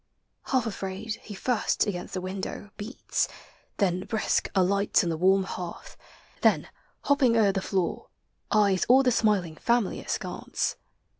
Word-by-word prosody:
Half 260 -3 +1
afraid, 200 +1 -4
he 210 - -9
firsl 235 0 0
Against 180 -3 -4
the 185 - -2
window 190 +2 -5
beats; 220 +4 -2 0.5
then, 185 -3 +2
brisk, 220 -2 0
alights 200 +3 +3
On 170 - 0
the - - -1
warm 190 +4 +4
hearth; 180 -2 -7 0.5
then, - - +3 0.3
hopping 270 -5 +3
o'er 210 -3 +5
the 195 0 -2
floor, 190 -3 -2 0.4
Eyes 200 -3 +3
all 260 +2 +7
the 250 - +3
smiling 195 -8 +1
family 235 -4 +1
askance. - - -3
200 Hz, 140 wpm, -27 LUFS, 185-225 Hz, 0.5 s, all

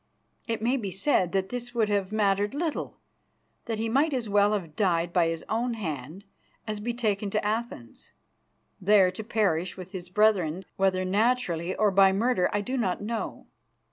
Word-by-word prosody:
It 225 -2 -2
may 250 +4 +2
be 210 -6 -3
said 185 - +1
that 190 0 0
this 240 0 -5
would 225 -2 +2
have 200 -2 0
mattered 205 +1 +1
little; 320 0 -3 0.7
that 225 -2 -3
he 225 +1 -1
might 280 +6 +2
as 240 -3 -2
well 205 0 +3
have 170 -7 -4
died 175 -3 +1
by 170 -2 +3
his 165 -1 -4
own 235 +2 -1
hand 160 - -6 0.4
as 215 -1 -4
be 235 +3 -2
taken 210 -4 -1
to 210 +1 -1
Athens, 215 - -4 0.7
there 190 -1 +5
to 200 +4 -7
perish 195 -6 0
with 185 0 -9
his 180 -3 -7
brethren, 190 -4 +2
whether 185 -1 +1
naturally 190 -4 0
or 210 -2 +2
by 195 0 +6
murder 215 -2 +2
I 205 - 0
do 255 +6 -3
not 190 -7 0
know. 220 +2 -4
205 Hz, 175 wpm, -27 LUFS, 185-225 Hz, 0.7 s, by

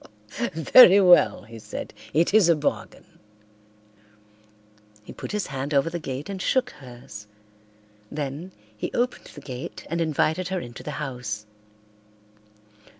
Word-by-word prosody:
"Very 185 - +7
well," 180 -2 +5
he 115 -1 -12
said. 105 0 -7 0.2
"It 165 +6 +2
is 210 -5 +5
a 170 - +5
bargain." 110 -10 -3 2.0
He - - -11
put - - -7
his 210 -1 -2
hand 135 +2 -4
over 140 +4 +2
the 175 - -4
gate 140 -1 -6
and 195 -2 -6
shook 255 +3 +1
hers. 120 -5 -12 0.8
Then 150 +5 -5 0.2
he 105 - -5
opened 245 0 -1
the 145 - -10
gate 130 -2 -8
and 170 0 -1
invited 160 +2 0
her 190 -1 -2
into 120 -7 -9
the 150 - -6
house. 125 -7 -5
150 Hz, 135 wpm, -24 LUFS, 125-180 Hz, 2.0 s, Very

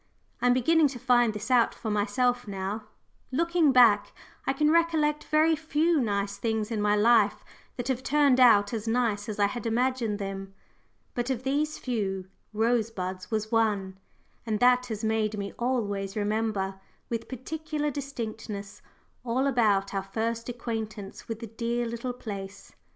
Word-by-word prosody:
I 245 - +3
am 245 - +6
beginning 315 +5 +4
to 265 -2 -6
find 240 -2 +3
this 215 +4 -6
out 240 -2 +4
for 220 - -4
myself 245 +4 +1
now 200 +2 -4 0.5
looking 335 +1 +3
back, 235 -5 +5 0.3
I - - +4
can 300 +2 +2
recollect 315 -3 +2
very 315 +1 +3
few 315 0 +1
nice 200 -3 -1
things 220 -1 -1
in 215 -2 -1
my 210 0 +3
life 215 -1 +4 0.3
that 245 -1 -3
have 260 -2 -1
turned 280 -2 +3
out 220 -4 +6
as 225 -1 -3
nice 225 -3 0
as 210 - -4
I 205 - +4
had 235 +3 -3
imagined 240 -2 0
them. 195 -1 -6 0.6
But 240 +1 -2
of 260 -2 -2
these 295 +3 0
few, 195 -6 -3 0.2
Rosebuds 215 -5 -1
was 220 0 -2
one, 205 -4 0 0.4
and 220 -2 -2
that 250 +1 +4
has 220 -3 -5
made 220 -1 0
me 200 -1 -4
always 205 -6 -1
remember 205 -2 -1 0.3
with 230 -1 -4
particular 300 +3 -3
distinctness 225 -7 -6 0.4
all 250 +2 0
about 210 -7 +2
our 195 - 0
first 225 +4 -3
acquaintance 220 -4 -5
with 225 0 -5
the - - -4
dear 235 +2 -2
little 235 +2 -4
place. 200 -4 -8
230 Hz, 155 wpm, -27 LUFS, 205-255 Hz, 0.6 s, am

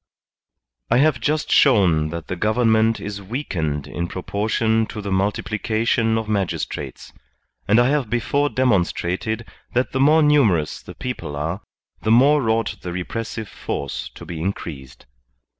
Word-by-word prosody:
I 120 - +4
have 145 0 +3
just 150 0 0
shown 90 - +4
that 85 0 -6
the - - -4
government 110 +2 +2
is 100 0 -6
weakened 85 - -3
in 85 +3 -4
proportion 110 +4 0
to - - -7
the 100 -1 -4
multiplication 110 +3 0
of 110 -1 -3
magistrates, 100 -4 -3 0.5
and 105 +3 +5
I 120 +1 +4
have 140 -6 0
before 140 +5 +1
demonstrated 110 -2 0 0.3
that 125 +1 +1
the 130 - -1
more 155 +3 +5
numerous 110 - +3
the - - -11
people 85 -13 -5
are, 80 +7 -3 0.4
the 110 - -2
more 130 +2 +5
ought 115 -1 0
the 90 - -5
repressive 110 +5 -4
force 70 -7 -5
to - - -10
be 80 -2 -6
increased. 75 -8 -5
110 Hz, 140 wpm, -22 LUFS, 90-120 Hz, 0.5 s, and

